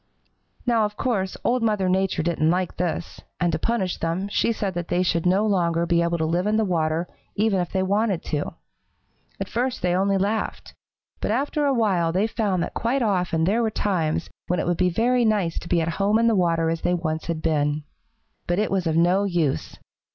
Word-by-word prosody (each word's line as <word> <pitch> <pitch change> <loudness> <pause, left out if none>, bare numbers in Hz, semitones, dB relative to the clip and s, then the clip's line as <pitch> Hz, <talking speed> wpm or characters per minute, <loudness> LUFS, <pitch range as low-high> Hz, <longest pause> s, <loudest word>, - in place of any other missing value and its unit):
"Now, 235 -3 +3
of 210 0 -5
course, 200 -8 -1
Old 250 +1 +1
Mother 210 -4 +1
Nature 190 -3 +1
didn't 165 -2 +1
like 180 +1 0
this, 175 -1 -3 0.2
and 175 -1 +2
to - - -1
punish 210 -6 -1
them 170 +4 -2
she 230 - +1
said 200 -4 -2
that 175 -1 -4
they 180 +1 +1
should 170 -1 +1
no 195 +4 +3
longer 170 -5 +1
be 170 0 +2
able 170 0 0
to 160 - 0
live 175 +4 0
in 215 +1 +2
the 220 - +2
water, 165 -2 0 0.3
even 205 -2 +2
if 175 - -2
they 190 -1 0
wanted 200 -1 0
to. 150 +1 -3 0.8
At - - -3
first 250 -1 -2
they 180 -1 +2
only 195 +1 +2
laughed, 205 +3 -2 0.5
but - - -2
after 285 +6 0
a 275 - +3
while 190 -8 +2
they 190 +5 +1
found 205 -6 0
that - - -5
quite 250 +3 0
often 180 -6 +1
there 205 +7 +2
were 225 - +1
times 175 -7 -1 0.2
when 180 - 0
it - - -1
would 175 - +1
be 180 -1 +3
very 240 +7 +2
nice 205 -7 +1
to - - -10
be 170 - +2
at 160 - -1
home 205 +2 +3
in 230 - +2
the 230 - +4
water 165 -4 +2
as 165 - -3
they 180 - +1
once 160 -2 -3
had 165 -2 -3
been. 150 -1 +1 0.6
But 175 - +1
it 210 - 0
was 190 -3 0
of 160 0 +1
no 180 +4 +3
use. 170 - -1
185 Hz, 215 wpm, -24 LUFS, 170-210 Hz, 0.8 s, the